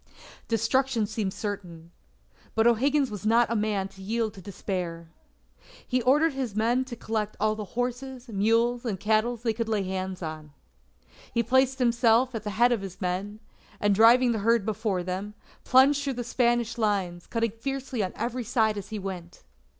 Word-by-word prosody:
Destruction 230 Hz, +1 st, +1 dB
seemed 210 Hz, -2 st, -2 dB
certain. 175 Hz, -6 st, -6 dB, 0.6 s
But 225 Hz, -, +3 dB
O'Higgins 265 Hz, +3 st, +3 dB
was 205 Hz, -2 st, -6 dB
not 230 Hz, +2 st, +3 dB
a -, -, +1 dB
man 210 Hz, -3 st, 0 dB
to 195 Hz, -, -15 dB
yield 220 Hz, +2 st, -1 dB
to 190 Hz, -, -11 dB
despair. 175 Hz, -3 st, -5 dB, 0.8 s
He 255 Hz, -1 st, +1 dB
ordered 290 Hz, +6 st, +3 dB
his 260 Hz, -6 st, -4 dB
men 235 Hz, +4 st, +1 dB
to 250 Hz, -2 st, -7 dB
collect 215 Hz, -2 st, -3 dB
all 215 Hz, 0 st, +2 dB
the 215 Hz, +1 st, -8 dB
horses, 250 Hz, +1 st, -3 dB
mules, 230 Hz, +3 st, +1 dB
and 210 Hz, -7 st, -3 dB
cattle 220 Hz, +4 st, +1 dB
they 225 Hz, 0 st, -1 dB
could 225 Hz, 0 st, -3 dB
lay 210 Hz, -3 st, +1 dB
hands 185 Hz, -1 st, -4 dB
on. 155 Hz, -2 st, -7 dB, 0.8 s
He 235 Hz, -, +1 dB
placed 260 Hz, +3 st, +2 dB
himself 240 Hz, 0 st, +3 dB
at 225 Hz, -, -3 dB
the 210 Hz, -, -3 dB
head 240 Hz, +2 st, +5 dB
of 235 Hz, -4 st, +1 dB
his 190 Hz, -2 st, -8 dB
men, 195 Hz, +3 st, -3 dB, 0.4 s
and 205 Hz, -1 st, +3 dB
driving 235 Hz, +4 st, +6 dB
the 225 Hz, -, -1 dB
herd 230 Hz, 0 st, +2 dB
before 215 Hz, -2 st, -1 dB
him, 190 Hz, +4 st, -4 dB, 0.3 s
plunged 275 Hz, +2 st, +5 dB
through 275 Hz, -1 st, -1 dB
the 245 Hz, -1 st, -4 dB
Spanish 240 Hz, -1 st, 0 dB
lines, 190 Hz, -5 st, -1 dB
cutting 230 Hz, -1 st, -1 dB
fiercely 265 Hz, +1 st, -4 dB
on 185 Hz, -, -3 dB
every 240 Hz, +2 st, -3 dB
side 220 Hz, -2 st, +1 dB
as 200 Hz, 0 st, -10 dB
he 220 Hz, -, -4 dB
went. 185 Hz, -3 st, -7 dB
225 Hz, 175 wpm, -27 LUFS, 200-245 Hz, 0.8 s, driving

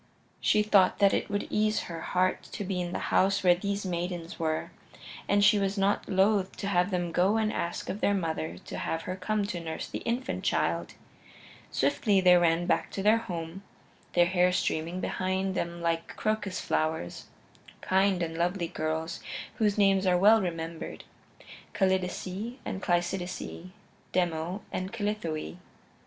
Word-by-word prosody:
She 210 Hz, -, +3 dB
thought 200 Hz, -3 st, +4 dB
that 200 Hz, -1 st, +4 dB
it -, -, 0 dB
would 205 Hz, 0 st, -1 dB
ease 215 Hz, 0 st, +2 dB
her 165 Hz, -1 st, -6 dB
heart 185 Hz, +1 st, +1 dB
to -, -, -3 dB
be 185 Hz, -1 st, -2 dB
in 175 Hz, -1 st, -3 dB
the -, -, -2 dB, 0.2 s
house 195 Hz, +1 st, +3 dB
where 180 Hz, -1 st, +7 dB
these 200 Hz, +2 st, -3 dB
maidens 175 Hz, -1 st, -4 dB
were, 160 Hz, -1 st, -1 dB, 0.6 s
and 200 Hz, 0 st, +4 dB
she 210 Hz, 0 st, +6 dB
was 195 Hz, +1 st, -1 dB
not 200 Hz, +1 st, +1 dB
loath 195 Hz, 0 st, +2 dB
to 200 Hz, -, -3 dB
have 180 Hz, -1 st, +2 dB
them 175 Hz, -3 st, -1 dB
go 190 Hz, +6 st, +3 dB
and 220 Hz, -1 st, +1 dB
ask 170 Hz, -, -3 dB
of 205 Hz, -, -4 dB
their 205 Hz, -, +3 dB
mother 160 Hz, -, -2 dB
to -, -, -6 dB
have 165 Hz, 0 st, -2 dB
her 185 Hz, -, -4 dB
come 205 Hz, +2 st, -1 dB
to 185 Hz, -3 st, -4 dB
nurse 160 Hz, -1 st, -5 dB
the -, -, -5 dB
infant 245 Hz, +3 st, -2 dB
child. -, -, 0 dB, 0.7 s
Swiftly 205 Hz, -4 st, +2 dB
they 180 Hz, -1 st, +6 dB
ran 170 Hz, 0 st, +3 dB
back -, -, +1 dB
to 195 Hz, -, -3 dB
their 215 Hz, +2 st, +5 dB
home, 170 Hz, -3 st, -6 dB, 0.5 s
their 175 Hz, -1 st, +5 dB
hair 180 Hz, 0 st, +3 dB
streaming 175 Hz, 0 st, -1 dB
behind 190 Hz, 0 st, -1 dB
them 170 Hz, -1 st, -3 dB
like 165 Hz, 0 st, -1 dB
crocus 215 Hz, -3 st, -1 dB
flowers; 155 Hz, -, -2 dB, 0.5 s
kind 190 Hz, -1 st, +2 dB
and 165 Hz, -1 st, -4 dB
lovely 175 Hz, +1 st, 0 dB
girls 160 Hz, 0 st, -3 dB, 0.4 s
whose 210 Hz, -2 st, +2 dB
names 195 Hz, -1 st, +4 dB
are 180 Hz, -1 st, +4 dB
well 215 Hz, +4 st, +6 dB
remembered 165 Hz, -2 st, -5 dB, 0.7 s
Callidice 190 Hz, +4 st, -1 dB
and 190 Hz, -, -4 dB
Cleisidice, 175 Hz, 0 st, -2 dB, 0.4 s
Demo 175 Hz, +2 st, -1 dB
and 185 Hz, +1 st, -3 dB
Callithoe. 205 Hz, -8 st, -3 dB
185 Hz, 160 wpm, -29 LUFS, 170-200 Hz, 0.7 s, where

